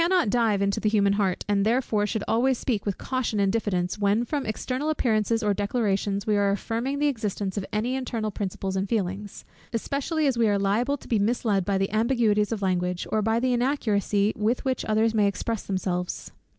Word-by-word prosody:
We - - +4
cannot 355 - +2
dive 220 -5 +2
into 200 0 0
the 215 - +1
human 200 -2 +3
heart, 195 -3 0
and 200 -1 +2
therefore 220 -2 +1
should 220 -1 -2
always 250 +3 +2
speak 220 -6 -2
with 200 - -1
caution 255 -5 -2
and 195 0 +2
diffidence, 190 -4 -1
when 205 +3 +2
from 285 +1 -2
external 255 +7 -2
appearances 225 -5 +1
or 205 -1 +2
declarations 200 -1 -1
we 210 -1 +2
are 200 0 +3
affirming 230 +7 -2
the 295 - +1
existence 210 -7 -2
of 200 -2 -3
any 225 +4 -1
internal 230 -5 -2
principles 195 -1 -3
and 190 +1 -1
feelings; 200 -1 -3 0.3
especially 285 +6 -1
as 260 -4 +1
we 225 -2 +4
are 205 - +2
liable 220 +8 +1
to - - -15
be 225 - +1
misled 205 -3 +1
by 195 0 +1
the 195 0 -1
ambiguities 220 -2 +2
of 215 -3 -2
language, 180 -1 0
or 215 - +2
by 225 +2 +1
the 255 +1 +1
inaccuracy 215 -5 +1
with 220 +6 0
which 260 -1 0
others 220 +1 +2
may 210 -2 +3
express 220 +2 -3
themselves. 185 -2 -3
215 Hz, 205 wpm, -26 LUFS, 200-240 Hz, 0.3 s, We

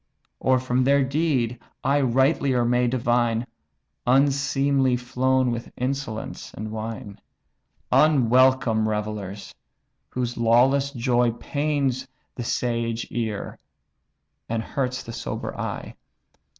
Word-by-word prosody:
Or 130 0 +3
from 130 0 0
their 140 +1 +4
deed 130 -4 0 0.2
I 140 +2 +2
rightlier 130 0 +2
may 125 +1 +2
divine, 120 -1 +1 0.6
Unseemly 135 0 +3
flown 130 +1 +1
with 120 0 -5
insolence 125 -4 -4
and 110 +1 -5
wine? 110 -2 -6 0.7
Unwelcome 130 -5 +4
revellers, 105 -2 -4 0.6
whose 125 -1 -3
lawless 125 +4 +4
joy 120 -2 +1
Pains 140 -1 -1 0.3
the 120 - -5
sage 115 -1 -1
ear, 110 -4 -3 0.9
and 115 0 -1
hurts 130 0 -2
the 115 - -8
sober 115 - -5
eye." - - -5
125 Hz, 100 wpm, -24 LUFS, 115-135 Hz, 0.9 s, their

